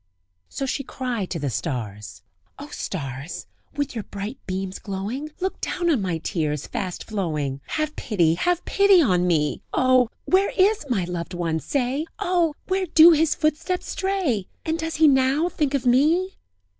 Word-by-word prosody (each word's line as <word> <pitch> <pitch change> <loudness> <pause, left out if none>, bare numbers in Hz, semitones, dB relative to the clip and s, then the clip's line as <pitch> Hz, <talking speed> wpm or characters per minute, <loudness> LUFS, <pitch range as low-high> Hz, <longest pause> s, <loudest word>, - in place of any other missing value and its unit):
So 275 - -3
she 275 +1 -2
cried 245 -7 -3
to 170 - -3
the 145 -4 -2
stars: 105 -5 -5 0.3
"O - - -9
stars! 140 +6 -5 0.3
with 285 -1 -2
your 225 -3 -4
bright 205 +6 -6
beams 190 0 -3
glowing! 210 +9 -4
Look 380 +1 -3
down 345 -1 0
on 265 -9 +2
my 180 -4 -1
tears 155 -3 -2
fast 185 -3 -4
flowing! 150 -10 -3
Have 310 0 -2
pity, 175 -8 +1
have 350 - 0
pity 400 -2 +5
on 180 - +3
me! 150 -4 +1
Oh! 255 -2 +4 0.2
where 385 +2 +3
is 395 -4 +3
my 210 -7 +1
loved 175 0 -5
one? 165 -2 -1
say! 270 - -1
Oh! 350 -6 +1
where 375 0 0
do 325 +1 +8
his 320 -1 +3
footsteps 310 +4 -1
stray? 370 - -1 0.2
And 320 +1 -1
does 325 0 -3
he 315 0 +5
now 275 +4 +3
think 290 -4 -1
of 265 -2 -2
me?" 315 +10 +3
255 Hz, 165 wpm, -24 LUFS, -, 0.3 s, do